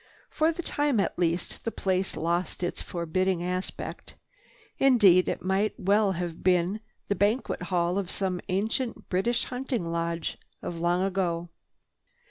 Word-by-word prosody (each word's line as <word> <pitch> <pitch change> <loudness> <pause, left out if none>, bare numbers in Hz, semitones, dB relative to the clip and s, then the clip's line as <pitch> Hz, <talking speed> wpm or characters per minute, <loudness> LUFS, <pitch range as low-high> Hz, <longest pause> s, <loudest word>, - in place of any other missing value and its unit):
For 315 +1 +3
the 345 +1 -5
time 290 -7 +1
at 195 - 0
least, 170 0 0
the - - 0
place 190 -3 -1
lost 170 +3 -1
its 175 - -2
forbidding 175 +1 -1
aspect. 180 +1 -4 0.6
Indeed 205 -9 +6
it - - -3
might 195 +3 +1
well 200 +1 +3
have 170 -2 -4
been 180 +3 +2 0.3
the - - +2
banquet 205 +4 +1
hall 175 +1 +1
of 190 -3 -4
some 185 -3 -2
ancient 220 +6 -1
British 195 +6 +1
hunting 250 -6 -3
lodge, 170 0 -2 0.2
of 170 - -4
long 175 +2 +2
ago. 175 -3 -1
185 Hz, 140 wpm, -28 LUFS, 175-210 Hz, 0.6 s, Indeed